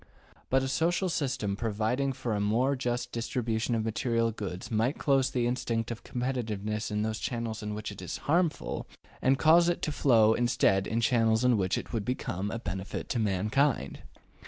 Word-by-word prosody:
But 130 0 +3
a - - -1
social 175 +7 +1
system 130 -11 -1
providing 115 +5 0
for 120 -3 -3
a 105 - 0
more 120 +7 +2
just 120 -2 -2
distribution 115 0 -1
of 110 -1 -1
material 115 +1 0
goods 95 -3 -6
might 115 +6 +1
close 135 -2 +2
to - - -8
the 120 -1 +2
instinct 120 -2 -1
of 120 - -6
competitiveness 110 -4 -2 0.2
those 110 0 -2
channels 115 -2 -3
in 105 0 -4
which 105 0 -5
it 100 - -9
is 90 - -4
harmful, 165 +1 0 0.3
and 135 +1 +3
cause 170 +3 +5
it 175 - -2
to 155 - 0
flow 115 -7 +4
instead 100 -5 +2
in 115 +1 0
channels 115 -1 +3
in 125 -1 +5
which 95 -3 0
it - - -6
would 110 -3 -1
become 100 -4 -3
a 115 - -3
benefit 95 -3 -5
to 120 - 0
mankind. 105 - 0
115 Hz, 180 wpm, -29 LUFS, 105-130 Hz, 0.3 s, cause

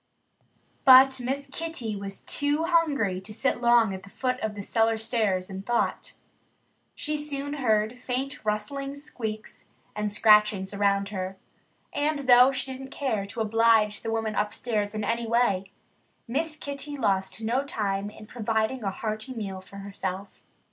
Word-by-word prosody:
But 265 0 +8
Miss 270 +3 -3
Kitty 285 -10 -4
was 195 -1 -6
too 290 +2 0
hungry 285 - +1
to 200 +3 -10
sit 240 +3 -1
long 235 -4 +4
at 190 - -6
the 200 - -14
foot 255 +3 -2
of 215 -1 -3
the 200 - -6
cellar 225 +1 +2
stairs 215 -5 0
in 190 0 -6
thought. 240 +4 -1 0.8
She 305 0 -2
soon 285 -1 -3
heard 225 -3 +1
faint 260 +3 -3
rustlings 275 +7 -2
squeaks, 220 -6 -6 0.3
and 210 0 -2
scratchings 210 -2 +4
around 200 0 +1
her. 190 -1 -4 0.6
And 295 0 0
though 250 +1 +8
she 265 0 -3
didn't 265 +1 -7
care 225 -9 -2
to 225 +3 -5
oblige 220 -1 +3
the 225 - -4
woman 225 -1 -1
upstairs 210 0 -1
in 215 - -2
any 230 +2 -1
way, 200 -5 +1 0.6
Miss 305 +6 -1
Kitty 285 0 -5
lost 195 -5 0
no 235 +5 0
time 205 -6 -2
in 215 0 -12
providing 225 +2 -1
a 195 - 0
hearty 215 +5 -4
meal 195 -4 -5
for 190 - -15
herself. 195 -1 -6
225 Hz, 155 wpm, -27 LUFS, 205-265 Hz, 0.8 s, But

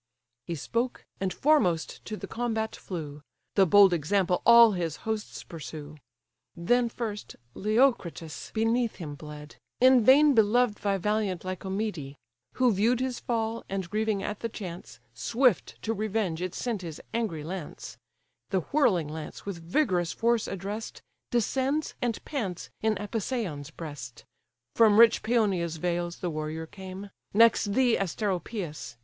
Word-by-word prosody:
He 170 - -2
spoke, 235 - -2
and 190 0 -1
foremost 225 - +1
to 215 - -5
the - - -6
combat 225 -2 -2
flew: 150 -5 -7 0.3
The 195 -2 +4
bold 200 0 +7
example 180 +3 +1
all 235 -1 +9
his 170 -5 -2
hosts 220 -1 -3
pursue. 155 -2 -8 0.6
Then, 235 +8 +2
first, 220 -3 -5 0.2
Leocritus 210 - 0
beneath 225 +1 +1
him 155 -5 -6
bled, 150 0 -10 0.2
In 255 -1 +6
vain 285 +5 +7
beloved 225 0 +3
by 200 -1 +1
valiant 200 -2 -1
Lycomede; 185 -6 -4 0.4
Who 250 -3 +3
view'd 225 +5 +2
his 255 -1 -2
fall, 230 -1 -2
and, 190 -2 -3
grieving 215 -2 0
at 210 +1 -4
the 230 - -3
chance, 175 - -8
Swift 230 - +1
to 225 - 0
revenge 210 -5 -1
it 185 -1 -3
sent 230 -6 -2
his 165 -4 -7
angry 210 -10 -2
lance; 175 0 -7 0.5
The 190 - +1
whirling 215 - +3
lance, 155 0 -8
with 190 -4 -5
vigorous 175 - +1
force 235 -1 +1
address'd, 200 +4 -6 0.3
Descends, 265 +6 0
and 240 -3 -2
pants 200 - -4
in 220 0 +2
Apisaon's 205 - -3
breast; 145 -7 -9 0.5
From 220 -2 +6
rich 230 -1 +7
Paeonia's 195 -8 +1
vales 175 +1 -2
the 175 - -1
warrior 155 +1 -4
came, 190 +3 -9 0.2
Next 220 -2 +5
thee, 250 0 +3
Asteropeus! 180 - -3
200 Hz, 140 wpm, -28 LUFS, 170-230 Hz, 0.6 s, all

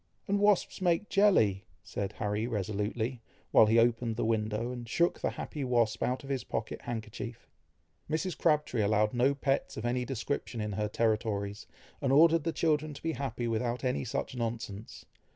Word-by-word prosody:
"And 200 +1 +1
wasps 205 -2 +2
make 180 +3 +1
jelly!" 110 - +3 0.2
said 100 0 -4
Harry 105 +1 -2
resolutely, 110 +3 -2 0.3
while 110 - +7
he 110 +2 +4
opened 115 0 +2
the 115 - -1
window, 110 +1 0
and 120 -2 -7
shook 170 +8 +2
the - - 0
happy 150 -3 -5
wasp 120 -4 +1
out 130 +3 -1
of 135 - -10
his 135 -2 -1
pocket 110 - -4
handkerchief. 115 +1 -6 0.6
Mrs. 165 +3 -1
Crabtree 150 -6 +1
allowed 105 +1 +2
no 130 +3 +3
pets 135 0 -1
of 110 - -4
any 125 +1 0
description 125 0 -3
in 105 -1 -2
her 105 +1 -1
territories, 105 -2 -1 0.3
and 135 - +1
ordered 160 +3 +5
the 165 - +1
children 155 -2 0
to - - -12
be 165 - 0
happy 125 -5 -3
without 120 +2 -1
any 125 - 0
such - - -3
nonsense. 115 -3 -5
120 Hz, 170 wpm, -30 LUFS, 110-140 Hz, 0.6 s, while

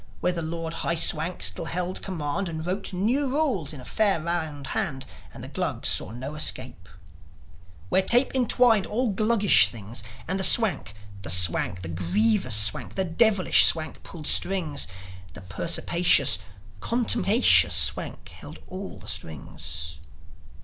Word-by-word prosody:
Where 180 +1 -1
the 170 - -5
Lord 165 0 -6
High 170 - -2
Swank 160 +2 0
still - - +1
held 180 +2 -3
command, 175 0 -4
And 160 -1 -7
wrote 185 +4 -4
new 235 +10 -1
rules 255 - -2
in 150 - -10
a 125 - -13
fair 205 - +1
round 160 -3 -5
hand, 135 -4 -4 0.3
And - - -12
the - - -9
Glugs - - -3
saw - - -2
no 130 +6 -8
escape; 130 -10 -3 1.0
Where 190 - +2
tape 240 +7 +3
entwined 245 -4 +2
all 235 +1 -2
Gluggish 200 - +3
things, 110 +2 -8 0.3
And 185 +3 -3
the - - 0
Swank, 195 - +3 0.3
the 85 - -8
Swank, 90 +1 +2
the - - -5
grievous 190 - 0
Swank, 105 0 +1
The 190 - 0
devious 195 +3 +1
Swank 160 -1 +4
pulled 160 -5 -11
strings 165 -7 +2 0.5
The 90 - -11
perspicacious, 155 - +1 0.4
contumacious 235 -1 +3
Swank - - 0
held - - -12
all 190 +1 -9
the - - -15
strings. 80 0 -4
170 Hz, 145 wpm, -24 LUFS, 130-200 Hz, 1.0 s, Swank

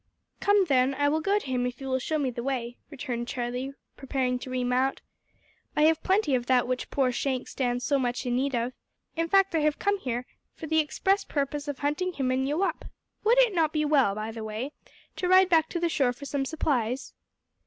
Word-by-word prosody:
"Come, 405 -1 +4
then, 270 -3 +2
I 285 +1 +2
will 310 +2 +1
go 400 +4 +2
to 415 - -4
him 250 -2 0
if 250 0 -6
you 270 - -6
will 260 0 0
show 310 +5 -1
me 275 -4 0
the 235 - -5
way," 245 -2 -3
returned 250 -5 -4
Charlie, 250 +2 -3 0.2
preparing 255 -2 -1
to 255 - -8
remount. 255 +1 0 0.8
"I 300 - +3
have 320 0 +4
plenty 380 -6 +2
of 245 -1 0
that 250 -1 +3
which 255 0 -2
poor 265 -3 +1
Shank 255 +1 -2
stands 245 -1 -2
so 280 -1 +2
much 245 +1 -2
in 245 -1 0
need 270 +1 0
of. 240 +2 -1 0.4
In 330 0 -1
fact 390 0 +4
I 325 - +2
have 300 -1 +1
come 405 -1 0
here 250 -5 -3 0.3
for 325 - -7
the 315 0 +2
express 385 +7 +1
purpose 285 0 -2
of 290 -2 -3
hunting 300 +6 -1
him 265 -4 -1
and 260 +1 0
you 305 +7 0
up. - - -2 0.4
Would 465 +3 +4
it 465 -5 0
not 320 -3 +2
be 305 -1 +1
well, 275 -9 +3
by 215 +1 -4
the 225 0 -7
way, 220 +6 -4 0.5
to 365 - -1
ride 370 0 +6
back 320 -2 +4
to 345 - -2
the 340 - +1
store 270 -6 +1
for 280 +3 -10
some 275 -1 -2
supplies?" 265 -5 -1
275 Hz, 225 wpm, -27 LUFS, 250-315 Hz, 0.8 s, ride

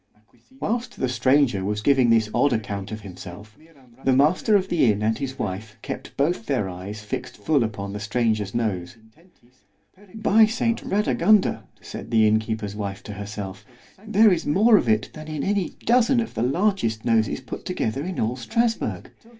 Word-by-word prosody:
Whilst 240 +2 -3
the 130 - +1
stranger 125 -4 +2
was 105 +1 -2
giving 130 -3 +4
this 115 -1 +4
odd 145 -3 +3
account 100 -2 -4
of 110 0 -6
himself, 100 +2 -10 0.5
the 135 - +3
master 160 +10 +3
of 190 -2 +2
the 155 - +3
inn 105 +1 -2
and 110 +1 +2
his 135 0 -5
wife 105 +2 -5
kept - - -7
both 140 -5 0
their 100 - 0
eyes 95 +4 -7
fixed 125 +4 -5
full 145 -5 +2
upon 100 -3 -4
the 105 - -5
stranger's 105 -1 -1
nose——By 120 - -2
saint 230 +1 -1
Radagunda, 210 0 +2 0.2
said - - -8
the 110 -2 +4
inn 110 +1 +4
keeper's 110 -2 -4
wife 100 -2 -5
to 105 - -7
herself, 100 -1 -7 0.4
there 220 0 +5
is 170 - -2
more 215 +10 +5
of 120 - +2
it 110 -1 +1
than 155 0 -9
in 155 -2 -4
any 200 -2 -1
dozen 245 +2 +4
of 230 - -3
the - - -3
largest 135 - 0
noses 110 -3 +2
put - - -8
together 120 +6 -2
in 180 +1 -4
all 115 +3 0
_Strasburg! 225 - -1
115 Hz, 170 wpm, -24 LUFS, -, 0.5 s, there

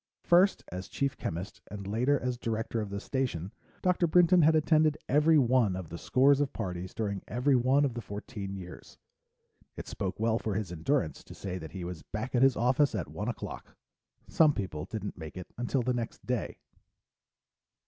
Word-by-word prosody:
First 180 +3 +4
as 90 +1 -5
chief 140 -1 -1
chemist, 85 +4 -5
and 100 -1 -7
later 125 +8 +1
as 125 0 -2
director 115 -1 -2
of 105 - -4
the 100 0 -4
Station, 100 - -2 0.3
Dr. 180 -1 +3
Brinton 175 +1 +5
had 160 +1 +5
attended 155 -1 +3
every 150 +3 +5
one 125 -7 +3
of 90 -4 -6
the 85 - -6
scores 140 +2 +4
of 145 - 0
parties 90 -3 -5
during 100 -4 -2
every 125 +5 +2
one 130 +4 +4
of 135 - -1
the 120 - -5
fourteen 100 -1 -6
years. 90 -2 -10 0.8
It - - -7
spoke 95 0 -4
well 115 +1 +2
for 105 -3 -2
his 100 -4 -2
endurance 85 - -1
to - - -11
say 95 -2 -5
that 80 - -9
he 95 -2 -5
was 85 -2 -6
back 110 +4 -5
at 125 - +3
his 135 -2 +5
office 130 +3 +2
at 90 -7 -3
one - - -5
o'clock. - - -6 0.5
Some 155 -3 +4
people 80 -6 -4
didn't 105 -4 -6
make 80 +1 -8
it 90 - -9
until 120 +2 -1
the 125 +1 +1
next 120 -2 -5
day. 125 -2 -2
115 Hz, 190 wpm, -30 LUFS, 95-140 Hz, 0.8 s, Brinton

